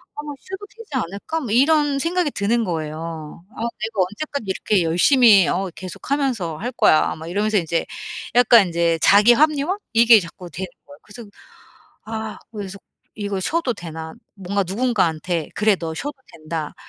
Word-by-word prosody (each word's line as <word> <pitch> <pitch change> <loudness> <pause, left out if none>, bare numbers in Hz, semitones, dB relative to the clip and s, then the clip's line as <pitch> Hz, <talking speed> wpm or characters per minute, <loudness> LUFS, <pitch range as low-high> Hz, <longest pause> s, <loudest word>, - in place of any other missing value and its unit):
'아 - - -8 0.2
쉬도 385 +2 -8
되지 455 -4 -13
않을까?' 245 - -3
뭐 240 -7 -5
이런 285 +3 +3
생각이 335 0 0
드는 230 +4 0
거예요. 160 -1 -5
'아 - - -7
내가 225 -3 -2
언제까지 220 +6 -3
이렇게 190 +1 +1
열심히 200 - +5
어 190 +1 -1
계속 185 +5 -9
하면서 240 - -1
할 245 +4 -4
거야?' 155 - +3
막 160 +1 -9
이러면서 210 +3 +1
인제 165 -1 -1 0.5
약간 235 -3 +6
인제 170 -1 +1
자기 210 +4 +6
합리화 305 +6 +2 0.2
이게 230 -1 +7
자꾸 175 0 -10
되는 185 +5 -5 0.2
거예요. 145 0 -14
그래서 230 +3 -11 0.8
아 220 0 -5
그래서 200 -3 -7 0.4
이거 200 -2 -3
쉬어도 280 - -1
되나 160 -3 -8 0.2
뭔가 195 +1 -2
누군가한테 180 -7 0
'그래 210 -1 +3
너 165 -2 -5
쉬어도 290 - -5 0.2
된다.' 155 -1 -5
205 Hz, 340 characters per minute, -21 LUFS, 170-245 Hz, 0.8 s, 이게